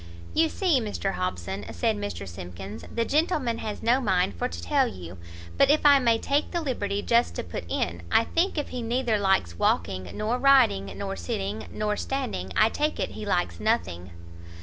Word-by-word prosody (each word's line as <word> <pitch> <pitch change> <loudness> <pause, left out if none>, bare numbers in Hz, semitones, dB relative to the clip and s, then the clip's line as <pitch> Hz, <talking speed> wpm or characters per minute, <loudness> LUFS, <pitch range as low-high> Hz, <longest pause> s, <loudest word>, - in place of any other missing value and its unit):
"You 325 0 +3
see, 335 -9 +2
Mr 205 -3 -2
Hobson," 95 - -3
said 225 -2 0
Mr 205 - -5
Simkins, 90 +4 -8
"the 230 0 0
gentleman 290 -6 +1
has 215 -1 -5
no 245 +4 +3
mind 185 - +1
for 85 - -2
to 85 - -7
tell 80 - +2
you; 90 -1 -9 0.4
but 275 - +6
if 300 +1 +3
I 285 -1 +8
may 235 -3 +3
take 285 +6 0
the 345 - -1
liberty 205 -9 -2
just 235 +1 +2
to - - -3
put 85 -1 -6
in, 85 0 -2
I 225 - +5
think 340 +8 0
if 295 - -2
he 250 - -4
neither 235 -1 0
likes 95 - +1
walking, 95 +2 0
nor 220 +4 -1
riding, 250 - +4
nor 95 0 -3
sitting, 95 +4 -4
nor 210 0 -1
standing, 250 - -3
I 215 - +5
take 300 +5 -1
it - - -1
he 215 - -7
likes 175 - 0
nothing." 85 +1 -1
210 Hz, 190 wpm, -26 LUFS, -, 0.4 s, I